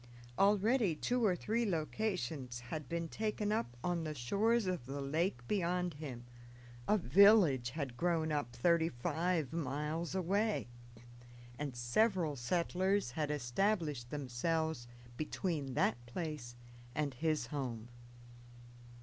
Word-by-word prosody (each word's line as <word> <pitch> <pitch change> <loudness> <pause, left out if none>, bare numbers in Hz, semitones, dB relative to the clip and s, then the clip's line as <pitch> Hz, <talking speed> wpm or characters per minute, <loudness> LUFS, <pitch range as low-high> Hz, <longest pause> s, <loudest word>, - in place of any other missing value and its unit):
Already 205 -1 +4
two 245 +9 0
or 195 -5 +4
three 225 +6 0
locations 155 - -2
had 155 -5 -4
been 170 0 -2
taken 210 +2 -2
up 120 - -1
on 175 -2 0
the 155 -1 -4
shores 210 - +2
of 180 -9 -2
the 140 +1 -4
lake 140 -3 -1
beyond 180 -3 0
him, 135 -5 -7 0.6
a 210 - +4
village 170 - +6
had 135 -3 -4
grown 165 -1 +1
up 145 -6 -1
thirty 165 +7 +3
five 160 +3 -1
miles 155 +3 -2
away, 200 +4 +1 0.9
and 145 -4 -3
several 160 - +2
settlers 180 +5 0
had 150 +2 -2
established 150 - 0
themselves 145 +1 -1 0.3
between 155 -4 -2
that 120 - +1
place 145 -4 -5 0.4
and 145 -3 0
his 155 0 0
home. 120 -5 -3
160 Hz, 120 wpm, -35 LUFS, 130-185 Hz, 0.9 s, village